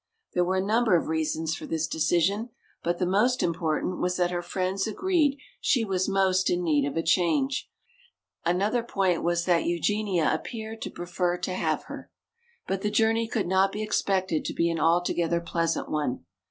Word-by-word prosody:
There 180 - +2
were 185 +2 0
a 190 0 0
number 220 -1 +3
of 165 - +1
reasons 160 0 -1
for - - -6
this 160 -1 -1
decision, 175 +8 +1 0.3
but 175 0 -1
the 180 - 0
most 215 +8 +2
important 165 +1 -1
was 180 0 0
that 175 -1 +1
her 175 -1 -1
friends 185 +3 -2
agreed 295 - +1 0.2
she 240 -4 +2
was 190 -1 0
most 190 -1 +2
in 180 0 0
need 145 -4 +2
of 145 - -4
a 165 - +1
change. 195 - +1 0.7
Another 195 +8 +1
point 195 -6 0
was 170 0 0
that 175 -2 +2
Eugenia 180 0 +1
appeared 220 -1 -5
to - - -4
prefer 175 0 -2
to 180 +1 -3
have 185 - -1
her. - - -9 0.6
But 195 0 -2
the 210 - 0
journey 225 +1 +2
could 220 -4 -1
not 190 +1 +3
be 210 +2 -3
expected 190 -5 0
to - - -3
be 170 0 +2
an 165 - -2
altogether 170 0 +2
pleasant 165 -1 -1
one. 145 - -2
180 Hz, 180 wpm, -27 LUFS, 170-210 Hz, 0.7 s, number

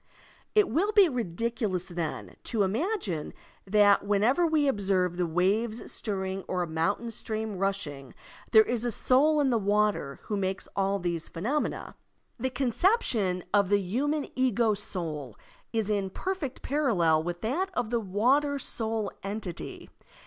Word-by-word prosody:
It 420 -2 +5
will 390 +7 +1
be 410 -3 +6
ridiculous, 225 - -2
then, 155 - -5
to 220 -3 +1
imagine 210 - -1 0.3
that 205 0 +5
whenever 220 - +3
We 310 -3 +2
observe 190 -7 +1
the 175 -1 0
waves 205 +7 0
stirring 190 -2 -3
or 180 -1 -1
a - - -4
mountain 180 +9 -1
stream 220 -3 -4
rushing 170 -9 -3 0.3
there 220 -2 +7
is 235 0 -1
a 240 - 0
soul 290 +7 +3
in 275 -3 +3
the 235 - +2
water 205 -8 +1
who 210 - -3
makes 190 0 -2
all 195 0 +1
these 170 -3 -3
phenomena. 240 - -2 0.4
The 260 +3 0
conception 240 - +1
of 200 -2 +4
the 205 - +5
human 275 +10 -1
ego 240 -4 +2
soul 160 - -4 0.4
is 225 -3 0
in 200 -2 0
perfect 335 - -4
parallel 195 - +2
with 175 +1 -4
that 315 - -1
of 240 -2 -1
the 235 - +2
water 255 +9 +2
soul 225 -5 -2
entity. 195 -3 -6
210 Hz, 145 wpm, -28 LUFS, 185-255 Hz, 0.4 s, there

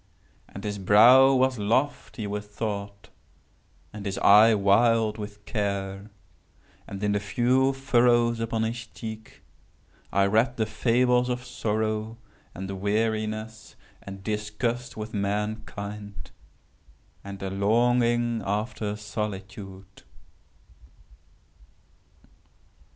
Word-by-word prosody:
And 100 - -10
his 105 -1 -4
brow 125 +8 +7
was 130 -2 +2
lofty 115 +1 -1
with 105 0 -4
thought, 100 -1 -5 0.8
and 105 -1 -6
his 95 - -3
eye 110 +2 +6
wild 110 +2 +3
with 105 0 -8
care; 100 -1 -3 0.8
and, 100 +1 -7
in 105 - +1
the 105 - +1
few 125 +6 +2
furrows 120 -3 +2
upon 115 -1 -1
his 115 0 -4
cheek 110 -1 -9 0.7
I 100 0 +3
read 115 +5 +2
the 110 - +1
fables 125 +3 +2
of 125 0 -3
sorrow, 110 -1 -2 0.4
and 95 0 -6
weariness, 110 +1 -2 0.3
and 95 0 -10
disgust 110 +4 -3
with 110 +1 -6
mankind, 100 -2 -4 0.9
and 100 0 -8
a 95 - -3
longing 120 +3 +2
after 105 +1 -2
solitude. 100 -2 -7
110 Hz, 100 wpm, -26 LUFS, 100-115 Hz, 0.9 s, brow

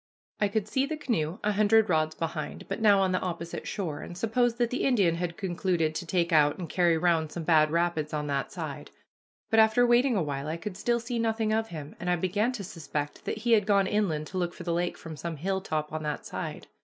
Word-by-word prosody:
I 205 - +3
could 210 0 -1
see 265 +4 0
the 310 +1 -3
canoe 180 - -1
a 210 - +2
hundred 215 +1 +4
rods 155 -3 +1
behind, 160 -2 -4
but - - -4
now 205 -3 +6
on 190 -1 +2
the 185 - +1
opposite 170 -2 -5
shore, 165 -8 -3
and 175 - -8
supposed 235 +3 +1
that 240 -1 +1
the 255 - -1
Indian 200 -11 +3
had 170 0 -3
concluded 175 -4 0
to 170 +2 -5
take 170 -1 +1
out 150 -2 +4
and 175 - -5
carry 170 -2 +2
round 160 -2 +1
some 170 - -5
bad 155 -2 +4
rapids 165 -2 0
on 150 -1 -2
that 140 -2 -2
side, - - -6 0.6
but 225 - +5
after 220 +2 +5
waiting 240 +1 +4
a 190 - +1
while 140 -1 -3
I 160 +2 -2
could 190 +2 -6
still 235 +4 0
see 235 0 -3
nothing 225 -1 0
of 225 0 +1
him, 155 -5 -8
and 175 - -3
I 180 - +3
began 205 +7 0
to 220 -5 -5
suspect 155 -5 -5
that - - -2
he 235 +2 -1
had 215 -3 +4
gone 200 -2 +4
inland 185 -8 0
to 185 - -3
look 175 -1 -2
for - - -8
the 170 -1 -1
lake 175 +1 -1
from 160 -1 -8
some 165 +1 -5
hilltop 160 -3 -2
on 155 - -2
that 150 -1 -4
side. - - -5
180 Hz, 240 wpm, -28 LUFS, 160-215 Hz, 0.6 s, now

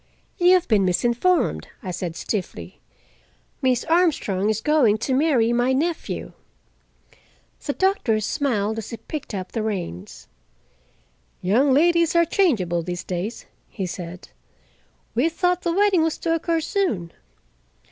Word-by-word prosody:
"You 355 +1 +6
have 360 -1 +1
been 210 -4 +3
misinformed," 240 - +1 0.2
I 185 - -4
said 175 -2 -4
stiffly. 195 +1 -5 0.8
"Miss 255 -2 +2
Armstrong 295 - +1
is 215 -1 0
going 245 -5 +3
to 260 +4 -2
marry 255 -5 +3
my 245 +2 +2
nephew." 320 +5 -2 1.3
The 285 - -2
doctor 375 - +1
smiled 220 -3 -1
as 220 - -7
he 230 - -6
picked 295 -6 -7
up 185 -1 -5
the 225 - -2
reins. 90 - -5 1.1
"Young 240 +10 +2
ladies 335 +4 +3
are 340 0 +5
changeable 210 - +1
these 175 +1 -5
days," 185 +6 -4 0.2
he 195 - -4
said. 180 0 -7 0.8
"We 255 +8 +2
thought 360 +2 0
the 340 - -1
wedding 390 -1 +3
was 320 -1 0
to 330 - -1
occur 330 0 0
soon. 245 - -1
245 Hz, 135 wpm, -23 LUFS, 195-330 Hz, 1.3 s, You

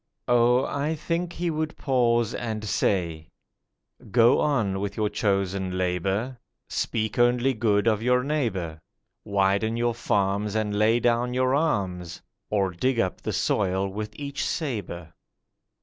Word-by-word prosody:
Oh, 120 +1 +4
I 145 +3 -1
think 170 +3 -2
He 175 0 -2
would 155 0 -3
pause 120 -4 +1
and 110 -3 -4
say: 85 -6 -1 0.8
'Go 120 +3 +5
on 110 -10 +1
with 100 0 -4
your 105 -1 +1
chosen 95 -3 -1
labour; 95 +7 -1 0.3
Speak 110 0 -2
only 120 +2 +3
good 105 -3 +1
of 110 -2 +2
your 125 +1 +2
neighbour; 100 - -2 0.4
Widen 100 +2 +1
your 120 0 +1
farms, 100 -2 0
and 110 -1 0
lay 110 +3 +3
down 120 +1 +1
your 130 0 +2
arms, 95 - -1 0.3
Or 100 -3 +1
dig 125 +8 0
up 95 -4 -1
the - - -3
soil 95 -1 0
with 105 +2 -5
each 140 -1 -4
sabre. 100 - -4
110 Hz, 135 wpm, -25 LUFS, 95-125 Hz, 0.8 s, Go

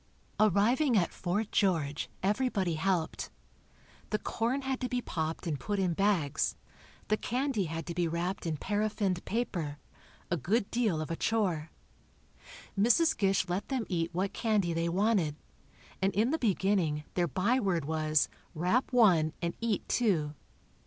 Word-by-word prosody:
Arriving 225 +5 +4
at 175 - +1
Fort 200 +4 -2
George, 160 -7 +1
everybody 200 -4 +1
helped. 165 0 -1 0.8
The 215 - +1
corn 240 +6 -1
had 265 -1 -1
to 250 - -1
be 250 - 0
popped 160 -8 -3
and 155 -5 -2
put 205 -1 -2
in 185 -3 +1
bags; 170 -6 +1 0.5
the 215 - +3
candy 250 -4 -1
had 165 0 -4
to 170 - -4
be 175 0 0
wrapped 175 +3 -2
in 155 -2 -1
paraffined 205 -1 -1
paper, 175 -10 -2 0.5
a 175 - +2
good 200 - 0
deal 215 -10 +1
of 155 - -5
a - - 0
chore. 180 -8 0 1.1
Mrs. 240 +11 +4
Gish 195 -2 +2
let 180 +3 -2
them 260 -5 -1
eat 170 -3 0
what 185 +3 -1
candy 210 -7 +1
they 165 +1 0
wanted, 185 -4 +2 0.7
and 195 +1 +3
in 225 +6 +2
the 320 - 0
beginning 190 - +1
their 175 -1 +1
by 205 - +1
word 180 - 0
was 155 0 +2 0.3
"Wrap 180 +11 +1
one 180 -11 +4
and 170 -1 -2
eat 225 -4 -1
two." 170 -11 +1
190 Hz, 150 wpm, -31 LUFS, 165-220 Hz, 1.1 s, Arriving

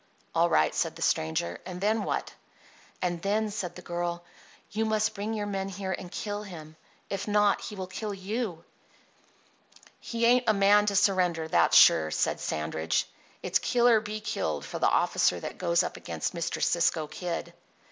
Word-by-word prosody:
"All - - +3
right," 75 0 +3
said - - -1
the - - -4
stranger. 80 +2 0
"And 180 -1 -7
then 215 +3 +1
what?" - - -3 0.7
"And 175 -2 -1
then," 210 +2 0
said 180 -4 -4
the 180 - -10
girl, 175 0 -3 0.5
"you 220 +1 -1
must 215 -1 +1
bring 210 +2 -3
your 210 -1 -2
men 195 -1 -3
here 195 0 -4
and 180 -1 -5
kill 205 -1 -4
him. 160 -6 -10 0.4
If 195 +1 -3
not, 210 -1 +3
he 210 - -7
will 190 -1 -4
kill 210 +3 -5
you." 200 -2 -4 1.4
"He 230 0 -2
ain't 245 +1 +4
a 215 - +4
man 205 +1 +5
to 200 - +1
surrender, 180 -5 +2
that's - - +4
sure," 80 -1 +7
said - - 0
Sandridge. 80 +1 -1 0.4
"It's - - +2
kill 240 -1 +2
or 230 -2 +6
be 215 0 -5
killed 75 - -2
for - - -6
the - - +3
officer 90 - +2
that - - -7
goes 170 -1 +2
up - - -5
against - - -4
Mr. 170 -2 -2
Cisco 165 -2 +2
Kid." 170 +2 -5
190 Hz, 180 wpm, -28 LUFS, 170-210 Hz, 1.4 s, sure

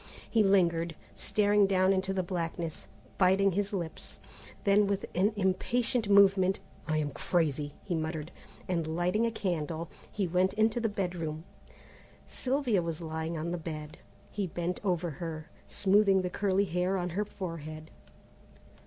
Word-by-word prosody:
He 225 - +3
lingered, 170 -5 +3 0.2
staring 205 -1 +3
down 190 0 +3
into 190 0 0
the 190 -1 0
blackness, 170 -2 -4 0.3
biting 195 +1 +4
his 200 +2 -1
lips; 170 -5 -5 0.5
then 200 0 +4
with 200 -1 -1
an 195 +4 +3
impatient 220 +4 +1
movement, 195 -1 +5 0.3
"I 155 -1 +1
am 150 -1 -1
crazy!" 150 -2 -1
he 185 - -3
muttered, 160 -1 -3 0.4
and 165 -3 -1
lighting 180 +7 +2
a - - -1
candle, 165 -5 -3 0.3
went 185 -1 +2
into 220 +2 +2
the 225 -1 0
bedroom. 175 -6 -3 0.8
Sylvia 255 -7 0
was 165 -1 -3
lying 160 0 -3
on 165 +2 -3
the 175 - -2
bed. 155 -1 -7 0.3
He 200 -2 -2
bent 175 +1 -3
over 175 -4 0
her, 160 -2 -5 0.2
smoothing 195 -1 +3
the 180 - -2
curly 200 0 +1
hair 180 +1 0
on 180 -1 -2
her 200 +5 0
forehead. 160 -6 -7
180 Hz, 145 wpm, -30 LUFS, 165-200 Hz, 0.8 s, movement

